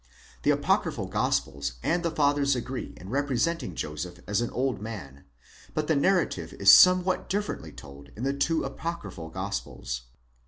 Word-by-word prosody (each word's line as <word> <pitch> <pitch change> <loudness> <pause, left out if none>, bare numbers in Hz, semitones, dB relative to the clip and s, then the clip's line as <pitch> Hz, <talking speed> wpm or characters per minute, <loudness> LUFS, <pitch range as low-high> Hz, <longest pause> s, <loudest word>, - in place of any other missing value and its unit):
6 65 +1 -28 0.2
The - - +1
apocryphal - - +1
Gospels 70 -1 -1
and 175 +1 +1
the 170 - 0
Fathers 145 -3 +2
agree 125 +1 -5
in 95 - -10
repre 140 +1 0
senting 165 - -1
Joseph 85 +4 -5
as 105 +3 0
an 120 - -1
old 130 -4 -1
man;® 80 -12 -8 0.5
but 155 - 0
the 160 - +2
narrative 180 +5 +1
is 100 -1 +6
somewhat 185 - +6
differently 205 +2 -2
told 70 0 -12
in 115 - -6
the 135 +1 +1
two 150 +4 +1
apocryphal 135 - -5
Gospels. 80 -10 -4
125 Hz, 160 wpm, -27 LUFS, -, 0.5 s, is